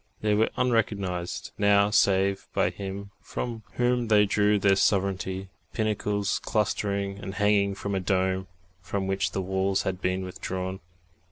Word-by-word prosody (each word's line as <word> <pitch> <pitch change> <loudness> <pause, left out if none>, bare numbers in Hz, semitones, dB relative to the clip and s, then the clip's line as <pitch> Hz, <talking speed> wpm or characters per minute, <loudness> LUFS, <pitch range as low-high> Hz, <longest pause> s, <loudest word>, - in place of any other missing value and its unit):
They 105 -1 +2
were 110 +2 +3
unrecognised, 100 -7 -1
now, 100 0 +4
save 100 -1 +2
by - - +2
Him 100 0 -6
from 115 -2 -5
whom 125 -1 +1
they 105 -1 +5
drew 105 +1 +3
their 100 -1 +4
sovereignty 95 -1 0 0.2
pinnacles 105 -3 0
clustering 100 -2 -1
and 95 -1 -6
hanging 100 -1 +2
from 100 +1 -4
a 95 - +1
dome, 95 0 0 0.3
from 95 +2 -3
which 95 0 0
the 95 - -2
walls 95 +1 0
had 95 -1 -3
been 95 0 -1
withdrawn. 95 +1 -4
100 Hz, 145 wpm, -27 LUFS, 95-105 Hz, 0.3 s, they